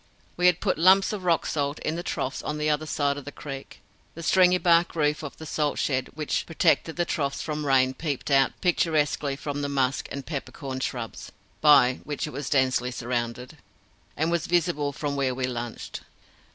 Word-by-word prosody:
We 180 Hz, 0 st, +3 dB
had 180 Hz, -1 st, +3 dB
put 190 Hz, -6 st, +1 dB
the -, -, -5 dB
lumps 190 Hz, +3 st, +5 dB
of 195 Hz, -3 st, -5 dB
rock 170 Hz, -2 st, +2 dB
salt 145 Hz, -1 st, -1 dB
in 155 Hz, -, -2 dB
the 170 Hz, -, -3 dB
troughs 135 Hz, -5 st, -3 dB
on 150 Hz, -, -3 dB
the 150 Hz, 0 st, +1 dB
other 150 Hz, +1 st, -1 dB
side 145 Hz, -2 st, 0 dB
of -, -, -11 dB
the 145 Hz, -, -6 dB
creek. 135 Hz, -1 st, -9 dB, 0.3 s
The 165 Hz, -, -7 dB
stringybark 180 Hz, -1 st, +4 dB
roof 150 Hz, -2 st, +1 dB
of 150 Hz, -3 st, -7 dB
the 160 Hz, -, -9 dB
salt 150 Hz, -1 st, -1 dB
shed 130 Hz, -2 st, 0 dB
which 155 Hz, -1 st, -2 dB
protected 165 Hz, 0 st, +2 dB
the 175 Hz, -, 0 dB
troughs 140 Hz, -4 st, -2 dB
from 150 Hz, -2 st, -3 dB
rain 130 Hz, -1 st, +4 dB
peeped 145 Hz, -1 st, -4 dB
out 135 Hz, -1 st, +3 dB
picturesquely 150 Hz, -5 st, +1 dB
from 145 Hz, 0 st, -4 dB
the 145 Hz, -, -2 dB
musk 135 Hz, -1 st, 0 dB
and 140 Hz, -1 st, -5 dB
peppercorn 135 Hz, -3 st, -5 dB
shrubs 120 Hz, -3 st, -5 dB, 0.3 s
by 140 Hz, -4 st, +6 dB
which 150 Hz, -2 st, -3 dB
it 150 Hz, -, -6 dB
was 145 Hz, -, -5 dB
densely 130 Hz, -3 st, +2 dB
surrounded, 125 Hz, +3 st, -4 dB, 0.6 s
and 160 Hz, +3 st, +1 dB
was 170 Hz, -2 st, 0 dB
visible 165 Hz, -4 st, +1 dB
from 145 Hz, 0 st, -3 dB
where 135 Hz, -2 st, 0 dB
we 130 Hz, 0 st, -1 dB
lunched. 120 Hz, -2 st, -5 dB
145 Hz, 190 wpm, -26 LUFS, 135-160 Hz, 0.6 s, by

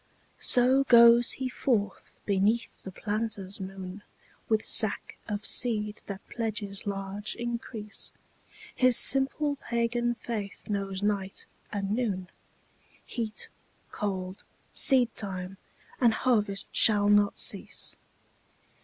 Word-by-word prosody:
So 255 Hz, +2 st, +6 dB
goes 235 Hz, -1 st, +7 dB
he 260 Hz, -, -4 dB
forth 225 Hz, -6 st, -2 dB, 0.2 s
beneath 205 Hz, +4 st, 0 dB
the 190 Hz, -, -8 dB
planter's 205 Hz, -1 st, -4 dB
moon 190 Hz, 0 st, -8 dB, 0.5 s
With 220 Hz, -1 st, +1 dB
sack 215 Hz, -2 st, +2 dB
of 210 Hz, 0 st, -4 dB
seed 210 Hz, -3 st, +2 dB
that 200 Hz, -1 st, -8 dB
pledges 210 Hz, -3 st, -4 dB
large 200 Hz, +1 st, -5 dB
increase, 235 Hz, -3 st, -6 dB, 0.6 s
His 255 Hz, -2 st, +3 dB
simple 280 Hz, +2 st, +2 dB
pagan 240 Hz, 0 st, -1 dB
faith 215 Hz, -4 st, -6 dB
knows 195 Hz, -1 st, -3 dB
night 200 Hz, -2 st, -2 dB, 0.3 s
and 200 Hz, -1 st, -3 dB
noon, 205 Hz, -6 st, -2 dB, 0.8 s
Heat, 220 Hz, -3 st, -3 dB, 0.4 s
cold, 190 Hz, -2 st, -4 dB, 0.3 s
seedtime 200 Hz, -8 st, +2 dB, 0.4 s
and 235 Hz, -3 st, +4 dB
harvest 210 Hz, -6 st, 0 dB
shall 205 Hz, -2 st, +5 dB
not 205 Hz, 0 st, +3 dB
cease. -, -, 0 dB
210 Hz, 100 wpm, -28 LUFS, 195-235 Hz, 0.8 s, goes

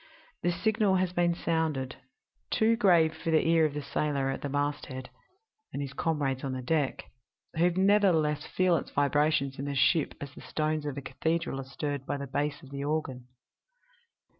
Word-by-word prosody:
The 175 Hz, -, +1 dB
signal 205 Hz, +2 st, +2 dB
has 185 Hz, -1 st, +1 dB
been 175 Hz, -1 st, +2 dB
sounded 160 Hz, -6 st, -1 dB, 0.5 s
too 225 Hz, +1 st, +3 dB
grave 170 Hz, -8 st, +4 dB
for 160 Hz, -, -4 dB
the 160 Hz, 0 st, +3 dB
ear 165 Hz, -1 st, +5 dB
of 145 Hz, -, -8 dB
the 150 Hz, -, -3 dB
sailor 140 Hz, -3 st, -1 dB
at -, -, -5 dB
the 145 Hz, -, -3 dB
masthead 145 Hz, -2 st, -3 dB, 0.6 s
and -, -, -4 dB
his 140 Hz, -1 st, -4 dB
comrades 140 Hz, -5 st, -1 dB
on 135 Hz, -1 st, -2 dB
the 130 Hz, -, -4 dB
deck 145 Hz, 0 st, 0 dB, 0.5 s
who 170 Hz, +2 st, +3 dB
nevertheless 185 Hz, -5 st, +3 dB
feel 185 Hz, -2 st, +2 dB
its -, -, -5 dB
vibrations 145 Hz, -1 st, +1 dB
in 140 Hz, -, -3 dB
the 140 Hz, 0 st, -3 dB
ship 140 Hz, +3 st, +2 dB
as 140 Hz, -1 st, -7 dB
the -, -, -12 dB
stones 155 Hz, -1 st, -2 dB
of 140 Hz, -1 st, -4 dB
a -, -, -3 dB
cathedral 165 Hz, -1 st, -1 dB
are -, -, -9 dB
stirred 140 Hz, +1 st, -4 dB
by -, -, -1 dB
the 140 Hz, -, -5 dB
bass 145 Hz, +2 st, -2 dB
of 135 Hz, -, -13 dB
the 140 Hz, 0 st, -4 dB
organ. 140 Hz, -4 st, -2 dB
150 Hz, 185 wpm, -29 LUFS, 140-170 Hz, 0.6 s, ear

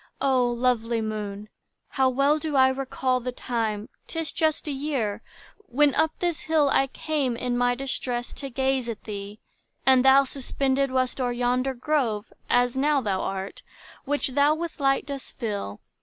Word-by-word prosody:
O 255 Hz, -3 st, +3 dB
lovely 240 Hz, -1 st, +1 dB
moon, 210 Hz, -2 st, -4 dB, 0.4 s
how 265 Hz, -1 st, +2 dB
well 275 Hz, +4 st, +2 dB
do 305 Hz, -2 st, -3 dB
I 260 Hz, -1 st, +6 dB
recall 260 Hz, -1 st, -1 dB
The 250 Hz, +1 st, -4 dB
time,—'tis 235 Hz, +7 st, -4 dB
just 315 Hz, -1 st, 0 dB
a -, -, -1 dB
year—when 275 Hz, -, -1 dB
up 315 Hz, +3 st, +3 dB
this 345 Hz, -3 st, -1 dB
hill 310 Hz, -3 st, +2 dB
I 270 Hz, -, +3 dB
came, 275 Hz, -3 st, -1 dB
in 245 Hz, 0 st, -1 dB
my 245 Hz, 0 st, +2 dB
distress, 245 Hz, -2 st, -3 dB
to 275 Hz, -, -7 dB
gaze 265 Hz, -1 st, 0 dB
at 225 Hz, -, -6 dB
thee: 205 Hz, 0 st, -7 dB, 0.4 s
And 260 Hz, -1 st, +6 dB
thou 270 Hz, +1 st, +7 dB
suspended 275 Hz, 0 st, -1 dB
wast 255 Hz, 0 st, 0 dB
o'er 245 Hz, -1 st, +1 dB
yonder 250 Hz, +2 st, 0 dB
grove, 240 Hz, -6 st, -1 dB, 0.2 s
As 245 Hz, 0 st, +3 dB
now 290 Hz, +2 st, +3 dB
thou 200 Hz, -6 st, -1 dB
art, 195 Hz, 0 st, -4 dB, 0.4 s
which 290 Hz, 0 st, 0 dB
thou 285 Hz, +3 st, +3 dB
with 335 Hz, 0 st, -5 dB
light 275 Hz, -1 st, +2 dB
dost 275 Hz, -1 st, -7 dB
fill. 205 Hz, -, -4 dB
260 Hz, 155 wpm, -25 LUFS, 240-280 Hz, 0.4 s, thou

